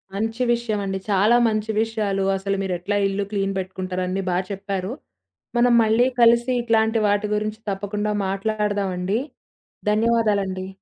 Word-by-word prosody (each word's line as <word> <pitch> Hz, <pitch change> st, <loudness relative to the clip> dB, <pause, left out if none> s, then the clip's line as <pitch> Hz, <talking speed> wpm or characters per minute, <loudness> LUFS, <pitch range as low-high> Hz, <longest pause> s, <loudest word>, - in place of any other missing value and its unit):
మంచి 225 Hz, +4 st, -1 dB
విషయమండి. 210 Hz, -5 st, -1 dB
చాలా 205 Hz, +5 st, +4 dB
మంచి 215 Hz, 0 st, -1 dB
విషయాలు 210 Hz, -3 st, -1 dB
అసలు 195 Hz, +1 st, -2 dB
మీరెట్లా 190 Hz, +2 st, -2 dB
ఇల్లు 195 Hz, +1 st, -1 dB
క్లీన్ 195 Hz, -1 st, -1 dB
బెట్టుకుంటారన్నీ 185 Hz, 0 st, -3 dB
బా 180 Hz, -, +1 dB
చెప్పారు. 195 Hz, 0 st, -3 dB, 0.7 s
మనం 240 Hz, 0 st, +4 dB
మళ్ళీ 225 Hz, +3 st, +3 dB, 0.2 s
కలిసి 235 Hz, +2 st, +5 dB
ఇట్లాంటి 225 Hz, -1 st, +2 dB
వాటి 205 Hz, +1 st, +1 dB
గురించి 215 Hz, +1 st, -3 dB
తప్పకుండా 205 Hz, +2 st, -2 dB
మాట్లాడదామండి. 200 Hz, -1 st, -1 dB, 0.7 s
ధన్యవాదాలండి. 210 Hz, -4 st, +1 dB
205 Hz, 115 wpm, -22 LUFS, 195-220 Hz, 0.7 s, కలిసి